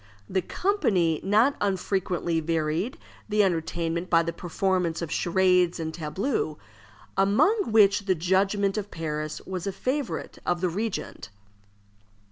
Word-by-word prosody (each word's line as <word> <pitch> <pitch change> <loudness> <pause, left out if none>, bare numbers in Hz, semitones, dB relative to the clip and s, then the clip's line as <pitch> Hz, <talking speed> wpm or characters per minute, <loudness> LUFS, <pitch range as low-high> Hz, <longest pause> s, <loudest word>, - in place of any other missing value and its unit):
The 190 - 0
company 185 - +1
not 220 +8 +3
unfrequently 185 -3 0
varied 165 - -1 0.3
the 210 0 +3
entertainment 170 -1 -1
by 165 -1 +4
the 170 0 -3
performance 175 -1 -1
of 165 - -5
charades 180 -1 +2
and 160 -1 -3
tableaux, 195 - -2 0.6
among 225 - +3
which 205 -2 +5
the 185 - +3
judgment 195 +4 +1
of 205 0 -6
Paris 155 -3 -4
was 185 0 -4
a - - 0
favorite 260 +7 -3
of 175 0 0
the 180 0 0
regent. 205 - -4
185 Hz, 125 wpm, -26 LUFS, 170-205 Hz, 0.6 s, which